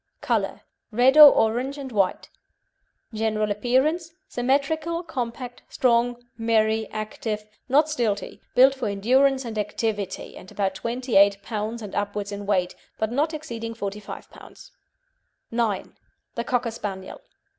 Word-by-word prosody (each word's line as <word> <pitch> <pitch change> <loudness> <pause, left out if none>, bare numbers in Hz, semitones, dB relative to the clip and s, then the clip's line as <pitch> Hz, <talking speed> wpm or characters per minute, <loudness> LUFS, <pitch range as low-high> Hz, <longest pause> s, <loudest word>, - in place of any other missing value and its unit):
COLOUR - - -1 0.3
Red 250 +5 +4
or 300 -2 +12
orange 245 +6 +1
and 270 -2 -7
white. 195 -4 0 0.9
GENERAL 215 -1 0
APPEARANCE 265 - +1 0.2
Symmetrical, 295 +7 0
compact, 250 -5 -5
strong, 240 0 +1
merry, 220 -1 +2
active, 215 0 -4 0.2
not 295 +4 +4
stilty, 235 -9 -2
built 265 +2 +7
for 260 -4 -3
endurance 260 +7 +2
and 220 -2 -4
activity, 210 -1 -3
and 185 - -12
about 195 -2 -1
28 225 -2 +2
lb. 220 +1 -4
and 205 - -8
upwards 205 0 -2
in 200 0 -6
weight, 185 -3 +1 0.2
but 220 0 -1
not 295 +6 +1
exceeding 235 -8 -6
45 205 -1 -6
lb. - - -14 0.8
IX. 230 -4 -1 0.4
THE 235 - -3
COCKER 245 -1 0
SPANIEL. 195 -4 -6
230 Hz, 125 wpm, -24 LUFS, 210-260 Hz, 0.9 s, or